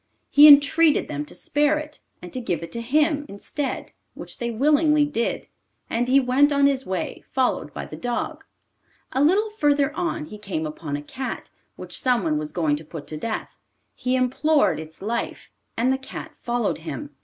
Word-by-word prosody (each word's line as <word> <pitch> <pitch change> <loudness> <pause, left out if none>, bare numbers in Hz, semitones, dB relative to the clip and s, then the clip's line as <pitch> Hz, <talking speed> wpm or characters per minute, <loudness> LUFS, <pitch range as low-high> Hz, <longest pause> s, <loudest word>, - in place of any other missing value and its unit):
He 295 +1 +9
entreated 295 +2 +6
them 145 0 -4
to - - -10
spare 295 +1 +1
it, 300 0 -7 0.2
and 180 - -9
to 255 - -3
give 170 -8 -2
it 170 - -8
to 235 - -4
him 295 +4 +2
instead 270 +8 -4 0.2
which - - -6
they 235 - -2
willingly 295 +5 +3
did, 265 -6 -2 0.4
and 240 +2 0
he 270 +2 +6
went 270 +3 +3
on 280 -1 +3
his 270 -2 +1
way, 185 -2 -3
followed 260 -1 0
by - - -6
the - - -9
dog. 245 -1 -3 0.7
A 265 - 0
little 400 +8 +3
further 295 -6 +1
on 340 -3 -2
he 210 -8 -10
came 180 -7 -3
upon 150 -1 -4
a 145 - -8
cat, 260 - -6 0.2
which - - -5
someone 195 - +1
was 150 0 -5
going 155 -4 +1
to 155 - -9
put 155 -1 -9
to 155 - -5
death. 220 +8 -4 0.4
He 255 0 -1
implored 265 - +2
its 160 +3 -10
life, 230 +3 -3 0.3
and 250 +3 +2
the 265 - -2
cat 265 - -8
followed 240 -6 -1
him. 290 - -6
255 Hz, 185 wpm, -23 LUFS, 195-290 Hz, 0.7 s, He